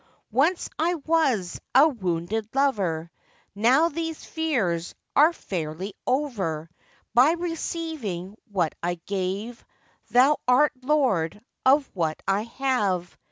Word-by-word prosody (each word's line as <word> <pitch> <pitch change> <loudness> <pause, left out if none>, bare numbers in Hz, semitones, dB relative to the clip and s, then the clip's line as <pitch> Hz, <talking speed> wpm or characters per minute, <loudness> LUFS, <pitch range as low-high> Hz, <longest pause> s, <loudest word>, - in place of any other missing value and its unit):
'Once 305 - +2
I 340 +3 +2
was 280 - 0
a 280 +4 +8
wounded 205 - -2
lover, 190 - 0 0.4
Now 255 - +4
these 325 0 -4
fears 215 - -1 0.2
are 305 +4 +7
fairly 185 - -5
over; 195 - -1 0.4
By 255 +7 +6
receiving 320 - -4 0.2
what 180 -6 0
I 175 +1 -1
gave, 195 +6 -4 0.5
Thou 265 +5 +5
art 265 +4 +5
lord 250 - +1 0.3
of 275 +1 +5
what 160 -4 -1
I 195 +1 +2
have. 230 -8 -1
230 Hz, 110 wpm, -25 LUFS, 180-295 Hz, 0.5 s, a